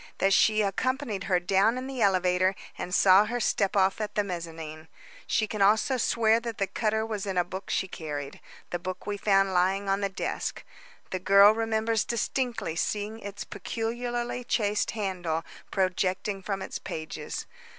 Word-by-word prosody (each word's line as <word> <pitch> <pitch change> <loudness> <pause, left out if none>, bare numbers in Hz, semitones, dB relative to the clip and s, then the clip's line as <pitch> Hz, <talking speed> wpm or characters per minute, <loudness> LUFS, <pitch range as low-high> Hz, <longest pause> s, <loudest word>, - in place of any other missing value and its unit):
That 195 0 +3
she 215 +2 +4
accompanied 220 0 -1
her 185 -2 +2
down 195 +6 +2
in 255 - -4
the 265 -2 -5
elevator, 185 -1 +3 0.2
and 180 - -5
saw 190 +2 +6
her 240 +3 -2
step 200 -3 +1
off 190 +2 +3
at 210 -1 -4
the 210 - +2
mezzanine. 165 -4 -6 0.4
She 220 - +2
can 215 -1 -4
also 215 +6 +4
swear 225 -1 +3
that 230 -2 -5
the 195 - +1
cutter 220 +2 -1
was 210 -3 -4
in 190 -2 -2
a 180 - +4
book 185 +2 -7
she 190 - 0
carried 145 -5 -6 0.3
the 175 - -2
book 185 +1 -6
we 205 - -2
found 195 -1 +2
lying 190 +2 +2
on 195 +1 +1
the 200 - 0
desk. 190 - -3 0.5
The 185 - -2
girl 200 +2 +7
remembers 225 0 0
distinctly 235 -6 -2
seeing 210 +5 -2
its 200 -1 -6
peculiarly 240 +1 -3
chased 210 -3 0
handle 175 -5 -2 0.3
projecting 190 +1 0
from 195 0 -3
its - - -5
pages. 155 -1 -5
200 Hz, 170 wpm, -28 LUFS, 185-220 Hz, 0.5 s, girl